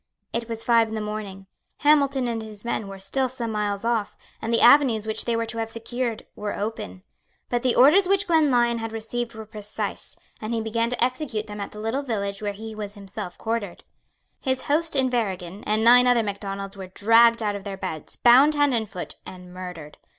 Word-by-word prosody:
It 235 0 -3
was 225 0 -4
five 230 -2 +4
in 220 - -5
the - - -2
morning. 210 -2 -5 0.4
Hamilton 280 -3 +3
and 230 -1 -2
his 215 0 -8
men 220 -3 -2
were 195 0 -8
still 255 +7 -1
some 240 -3 -4
miles 205 0 -2
off; 230 -3 -1 0.2
and 225 - -3
the 230 - +3
avenues 245 -4 +6
which 220 0 -2
they 235 - 0
were 230 0 0
to 230 0 -4
have 225 0 -2
secured 235 +1 -4
were 210 0 -4
open. 200 - -5 0.5
But 240 -1 0
the 255 -1 +2
orders 330 +9 +6
which 395 +1 +3
Glenlyon 250 -9 +3
had 225 0 -4
received 230 +1 -4
were 220 0 -8
precise; 210 -1 -4 0.2
and 220 +2 -2
he - - 0
began 230 +1 -1
to 245 - 0
execute 250 -4 -2
them 210 -1 -7
at 200 - -4
the - - -12
little 225 +6 -1
village 200 -6 -3
where 205 -1 -1
he 220 +2 -8
was 210 -1 -6
himself 195 -3 -7
quartered. 225 -5 -3 0.6
His 260 -1 -1
host 315 +2 +1
Inverriggen 210 -8 -1
and 215 +1 +1
nine 245 +2 +7
other 245 -2 +4
Macdonalds 195 -1 -5
were 190 -1 -8
dragged 230 +4 +4
out 205 -1 0
of 200 - -6
their 195 -1 -6
beds, 160 -5 -5
bound 265 +5 +6
hand 290 -2 +3
and 220 -3 -1
foot, 180 -3 -7
and 180 -1 -11
murdered. 180 -5 -8
225 Hz, 205 wpm, -24 LUFS, 205-245 Hz, 0.6 s, nine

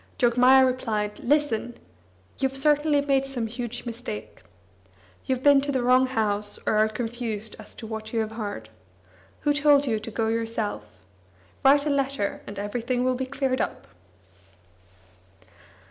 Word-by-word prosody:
Jogmaya 250 +2 +5
replied: 220 -5 -2
"Listen! 245 -4 0 0.6
You've 270 0 0
certainly 295 +1 +3
made 275 -1 +1
some 250 -4 -2
huge 240 +1 -5
mistake. 165 - -7 0.9
You've 260 -1 -1
been 285 -1 +6
to 285 +1 -2
the 260 -3 0
wrong 255 +1 +4
house, 210 -4 -1
or - - +1
are 215 0 +4
confused 225 -1 -4
as - - -12
to 225 - -9
what 220 0 -6
you 230 - 0
have 220 0 -3
heard. 205 - -6 0.7
Who 295 - +2
told 290 -1 +4
you 225 -5 0
to 220 - -7
go 225 0 -1
yourself? 225 - -2 0.8
Write 280 +2 +5
a 300 - +1
letter, 275 -6 -1
and 205 - -8
everything 235 +5 -2
will 255 0 +2
be 260 +1 -3
cleared 265 -1 -1
up." - - -4
245 Hz, 145 wpm, -25 LUFS, 220-270 Hz, 0.9 s, been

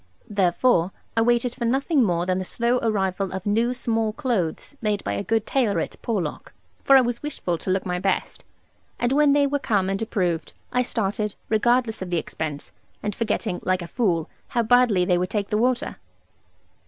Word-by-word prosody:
Therefore 190 -1 +3 0.3
I 225 - +3
waited 240 +1 +2
for 235 - -4
nothing 275 +5 +2
more 175 -4 +1
than 185 0 0
the - - -2
slow 235 +6 0
arrival 195 -4 0
of 190 0 -5
new 225 +4 +2
small 225 -3 0
clothes 230 - -2
made 210 -3 0
by - - -2
a - - -2
good 225 +1 0
tailor 235 -7 +1
at - - -5
Porlock, 190 -10 -3 0.3
for 275 - +7
I - - +7
was 240 -1 -2
wishful 185 - -3
to - - -5
look 185 0 +1
my 180 -1 -1
best; 190 +1 -1 0.5
and 245 - 0
when 290 0 +4
they 285 0 +4
were 285 +1 0
come 195 -7 +1
and 195 - -2
approved, 180 -7 -1 0.2
I 250 - +2
started, 210 -3 -1
regardless 235 0 +2
of 185 - -4
the 175 - 0
expense, 155 -2 -5 0.3
and 210 0 -1
forgetting 210 -4 -1
(like 185 -1 0
a - - -7
fool) 175 -8 0 0.2
how 240 -2 0
badly 230 -5 +4
they 180 -1 +2
would 180 0 -1
take 205 -1 -2
the 210 - +2
water. 255 +3 0
215 Hz, 190 wpm, -24 LUFS, 185-240 Hz, 0.5 s, for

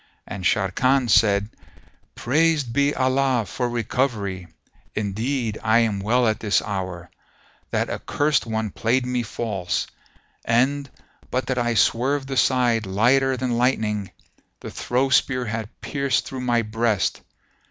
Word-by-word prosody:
And 95 - -7
Sharrkan 120 +7 +2
said, 105 -1 +3 0.6
"Praised 150 -1 +1
be 140 +2 +2
Allah 130 -2 +1
for 125 +6 -3
recovery; 110 -6 -2 0.5
indeed, 110 +3 -2
I 110 0 +4
am 110 -3 0
well 120 +5 +2
at 110 0 0
this 105 -3 +2
hour. 95 -4 -5 0.6
That - - 0
accursed 145 -4 0
one 110 -2 -2
played 125 +5 0
me 125 -1 -1
false; 105 -5 -3 0.6
and, 135 +4 +1 0.4
but 130 +1 -1
that 130 -1 -1
I 120 -1 0
swerved 135 +6 +1
aside 125 -4 +2
lighter 130 +7 +2
than 120 -1 -1
lightening, 105 -6 0 0.5
the - - -8
throw 130 +2 0
spear 125 0 +2
had 110 -1 -4
pierced 140 -2 -1
through 130 -1 -6
my 120 -2 +1
breast. 110 -1 0
120 Hz, 130 wpm, -23 LUFS, 105-130 Hz, 0.6 s, I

